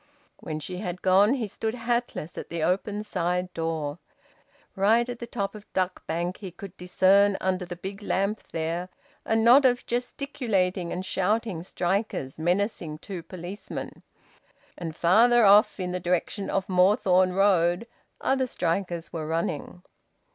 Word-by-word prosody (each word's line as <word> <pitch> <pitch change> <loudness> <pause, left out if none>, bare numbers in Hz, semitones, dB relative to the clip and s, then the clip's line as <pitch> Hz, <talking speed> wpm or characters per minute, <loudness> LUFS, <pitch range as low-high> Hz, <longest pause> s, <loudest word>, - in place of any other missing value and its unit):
When 155 0 -5
she 180 +4 -6
had 180 -2 -5
gone, 195 +6 +5
he 235 -5 -2
stood 220 +3 -3
hatless 235 -8 -2
at - - -7
the 170 -2 -3
open 200 +4 0
side 180 -2 -2
door. 160 -2 -3 0.8
Right 220 +5 +3
at 245 -1 -6
the 235 - -6
top 200 -4 -3
of 210 -1 -13
Duck 185 -1 -2
Bank, 170 +3 -2
he 195 - -7
could 180 +2 -10
discern, 190 +2 +3
under 185 -1 -1
the 175 0 -6
big 195 +4 -7
lamp 200 +1 -1
there, 165 +3 -2 0.4
a 225 - +1
knot 235 +5 +6
of 250 -1 +3
gesticulating 230 - -1
and 185 +1 -4
shouting 195 -1 0
strikers, 180 -6 -2
menacing 175 -2 -1
two 180 +2 -7
policemen; 180 +4 -7 0.7
and 165 -3 -6
farther 225 +8 +5
off, 205 +2 +6
in 180 -1 -2
the 180 - -2
direction 180 +3 -1
of 195 -1 -1
Moorthorne 185 -1 +4
Road, 185 0 +3 0.3
other 265 -1 +1
strikers 170 -5 -2
were 160 -2 -4
running. 165 +1 -3
185 Hz, 145 wpm, -26 LUFS, 175-210 Hz, 0.8 s, knot